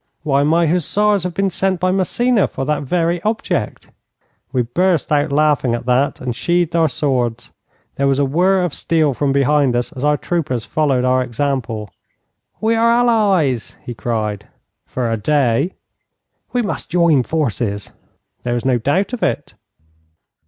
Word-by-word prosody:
'Why, 140 -2 +2
my 165 +4 +3
hussars 190 +4 +1
have 180 -2 -4
been 195 -1 0
sent 190 0 0
by 185 +1 +1
Massena 210 +4 +1
for 135 - -5
that 150 +1 0
very 170 +4 0
object.' 215 +3 -2 0.6
We 130 -2 +1
burst 170 +7 0
out 145 0 +2
laughing 145 -4 +2
at 120 - -6
that, 130 +3 +1
and 125 -2 -4
sheathed 175 +2 0
our 165 -2 +3
swords. 125 -4 -2 0.5
There 140 - +1
was 135 -1 +2
a 140 - +2
whirr 180 +7 +2
of 175 -5 -2
steel 155 -4 +1
from 140 +2 0
behind 140 -1 +2
us 120 0 -1
as 130 - -7
our 150 0 +3
troopers 140 -10 -2
followed 135 -5 +1
our 130 0 +2
example. 120 -4 -3 0.7
'We 225 +1 +1
are 230 +1 +3
allies!' 205 - +2
he 120 - -6
cried. 105 -2 -3 0.4
'For 120 -3 -2
a 115 - 0
day.' 140 - +1 0.8
'We 245 -1 0
must 205 - -4
join 170 -5 +3
forces.' 120 -8 -2 0.5
'There 120 0 -2
is 120 - -3
no 125 -2 +2
doubt 180 - 0
of 245 - -4
it.' - - -2
145 Hz, 160 wpm, -18 LUFS, 125-180 Hz, 0.8 s, my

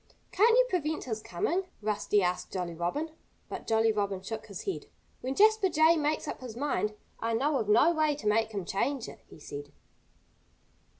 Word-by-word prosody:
"Can't 455 +4 +5
you - - +6
prevent 315 -7 -1
his 220 -3 -4
coming?" 345 - -1
Rusty 210 -1 +1
asked 180 0 -1
Jolly 180 -3 -3
Robin. 175 - -2 0.4
But - - -7
Jolly 225 0 +3
Robin 200 -3 -2
shook 220 +2 -6
his 200 -4 -7
head. 390 - -4 0.3
"When 260 +2 -3
Jasper 430 -1 +5
Jay 320 0 +5
makes 305 -1 0
up - - -5
his 240 -3 -8
mind, 245 -6 -1 0.2
I 230 0 0
know 280 +5 +2
of 210 - -2
no 235 +10 +6
way 310 -2 +2
to 280 - -10
make 220 +1 +2
him 200 -4 -4
change 255 +8 -1
it," - - -10
he - - -14
said. 145 -1 -8
225 Hz, 185 wpm, -30 LUFS, 205-310 Hz, 0.4 s, you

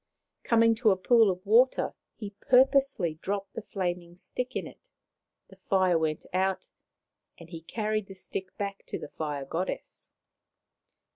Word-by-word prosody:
Coming 230 -1 +4
to 225 - +5
a 190 - +3
pool 225 +3 +5
of 185 +1 -3
water, 235 +5 +4 0.2
he 205 -2 -7
purposely 255 - +3
dropped 200 0 -3
the - - -5
flaming 175 -4 -4
stick 250 +7 -5
in - - -2
it. - - -14 0.6
The - - -16
fire 185 -4 +2
went 155 -1 -2
out, 190 +1 0 0.7
and 170 0 -14
he 165 -2 -7
carried 215 +3 -2
the 195 - -10
stick 185 0 -6
back 200 -1 -4
to - - -4
the - - -8
Fire 145 -3 -4
Goddess. 170 +7 -5
195 Hz, 150 wpm, -28 LUFS, 175-225 Hz, 0.7 s, to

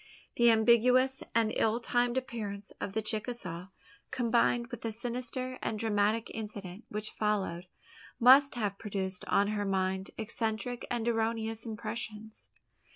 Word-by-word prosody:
The 235 0 +6
ambiguous 250 +4 +4
and 225 -1 +3
ill 225 +1 +2
timed 245 +1 +1
appearance 210 -6 -4
of 195 - -3
the 220 - -1
Chicasaw, 215 -5 -4 0.4
combined 235 0 +1
with 240 - -6
the 225 - -2
sinister 250 +3 -2
and 220 - -2
dramatic 215 0 +1
incident 205 -2 -7
which 210 +1 -3
followed, 195 -4 -1 0.5
must 265 +3 +7
have 205 -4 -2
produced 190 -3 -4
on 200 +1 +2
her 210 -1 -1
mind 190 -1 -1
eccentric 225 +2 -2
and 235 -1 -1
erroneous 225 0 -1
impressions. 220 -1 -6
220 Hz, 130 wpm, -31 LUFS, 205-240 Hz, 0.5 s, must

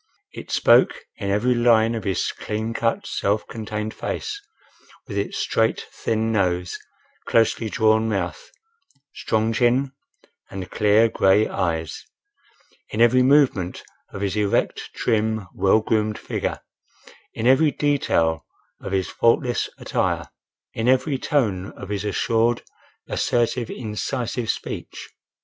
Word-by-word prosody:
It - - -9
spoke - - +4 0.2
in 100 - -3
every 110 +6 +2
line 115 -1 +4
of 110 -4 -4
his 95 -3 0
clean 110 +2 -4
cut, 115 0 -1
self 105 +2 -1
contained 110 -1 -5
face, 420 -2 -4 0.7
with - - -6
its - - -2
straight, 455 - 0
thin 110 0 -1
nose, 90 -4 0 0.5
closely 115 0 +2
drawn 110 0 +2
mouth, 95 -4 -3 0.6
strong 110 +1 0
chin 125 +3 +2 0.6
and 95 -2 -7
clear 105 +2 +4
gray 105 -1 +3
eyes; 80 -3 -2 0.9
in 105 - -5
every 120 +2 +5
movement 130 -9 +3 0.3
of 100 - -7
his 100 -1 -1
erect, 105 -2 0
trim, 110 -2 0
well 100 +3 +3
groomed 110 -1 0
figure; - - -3 0.7
in 110 - -3
every 135 +5 +5
detail 110 - +1 0.4
of - - -5
his 95 -1 0
faultless 120 +1 +1
attire; - - -1 0.4
in 115 +1 -2
every 130 +2 +2
tone 105 -12 0
of 100 - -10
his 100 -1 -2
assured, 115 +3 +1 0.4
assertive, 120 0 0
incisive 120 +1 -3
speech. - - -5
110 Hz, 125 wpm, -23 LUFS, 100-120 Hz, 0.9 s, every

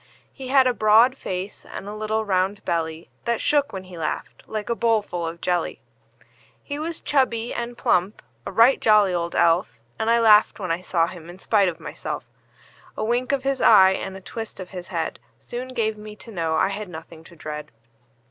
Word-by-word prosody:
He 265 - -8
had 265 0 +5
a 250 - +3
broad 225 +3 +5
face, 190 -5 -5
and 195 - -8
a 205 - -5
little 215 +1 -2
round 190 +1 0
belly 160 -1 -2
That 235 -1 0
shook 290 -1 +2
when 190 -1 -6
he 180 -2 -11
laughed, 155 - -4
like 215 -1 -4
a 235 - +1
bowl 230 -2 +2
full 175 -4 -4
of 170 +1 -7
jelly. 175 -2 -1 0.8
He 285 0 -5
was 325 +1 -4
chubby 240 -5 +1
and 240 0 -4
plump 180 +4 +1 0.2
a - - -6
right 235 +4 +5
jolly 210 -4 +5
old 170 -1 -2
elf; 165 -7 +2 0.2
And 220 - 0
I 235 0 +4
laughed 215 -2 +5
when 185 -4 -3
I 170 +2 -1
saw 170 -2 +1
him 170 -1 -9
in 175 - -10
spite 200 -1 +2
of 165 - -8
myself. - - -6 0.7
A - - -2
wink 240 +4 0
of 275 -2 0
his 275 0 -1
eye, 190 -4 +7
and 190 0 -4
a - - -12
twist 225 +3 -7
of 185 -1 -8
his 180 -2 -7
head, 165 -3 -3 0.2
Soon 245 +1 -6
gave 220 -4 -2
me 210 0 -9
to 230 - -12
know 165 -5 -1
I 190 - +2
had 200 0 -5
nothing 160 -1 -10
to 170 - -15
dread. 150 -1 -7
205 Hz, 205 wpm, -23 LUFS, 175-230 Hz, 0.8 s, eye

